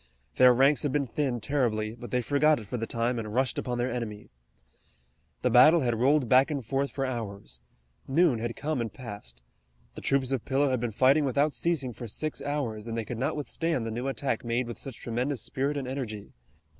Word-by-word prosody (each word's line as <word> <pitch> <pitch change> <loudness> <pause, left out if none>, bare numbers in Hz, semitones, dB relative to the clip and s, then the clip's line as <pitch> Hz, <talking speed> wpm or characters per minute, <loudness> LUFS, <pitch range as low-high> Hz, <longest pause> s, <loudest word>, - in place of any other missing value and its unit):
Their 125 0 +8
ranks 135 +4 +4
had 145 - -1
been 140 0 +1
thinned 125 -2 -2
terribly, 110 -7 0
but 120 0 -9
they 125 +3 0
forgot 145 +3 +3
it 110 - -9
for 100 - -5
the 115 0 -3
time 120 +1 -1
and 110 -1 -5
rushed 130 0 +1
upon 125 -1 -3
their 120 +1 -1
enemy. 110 -4 -5 1.1
The - - +2
battle 165 +1 +7
had 120 -3 0
rolled 135 +1 +3
back 130 +4 +5
and 140 -5 -3
forth 135 +4 0
for 135 - -2
hours. 110 -6 -5 0.5
Noon 140 -3 +3
had 115 +1 -3
come 150 -3 -2
and 115 -2 -3
passed. 100 - -9 0.5
The - - -9
troops 135 -1 +1
of 130 -4 -1
Pillow 140 0 +1
had 130 - +1
been 120 0 -1
fighting 135 +7 +4
without 140 +2 +1
ceasing 145 -8 -1
for 120 +1 -7
six 155 +8 -3
hours, 120 -7 -3
and 115 0 -3
they 115 - -2
could 115 +1 -5
not 135 - 0
withstand 150 -2 -2
the 115 - -3
new 120 +4 -3
attack 135 -3 -2
made 120 +1 0
with 120 -2 -7
such 135 -4 -8
tremendous 125 +3 -2
spirit 140 +2 -2
and 135 -2 -3
energy. 120 -6 -5
125 Hz, 210 wpm, -28 LUFS, 115-140 Hz, 1.1 s, Their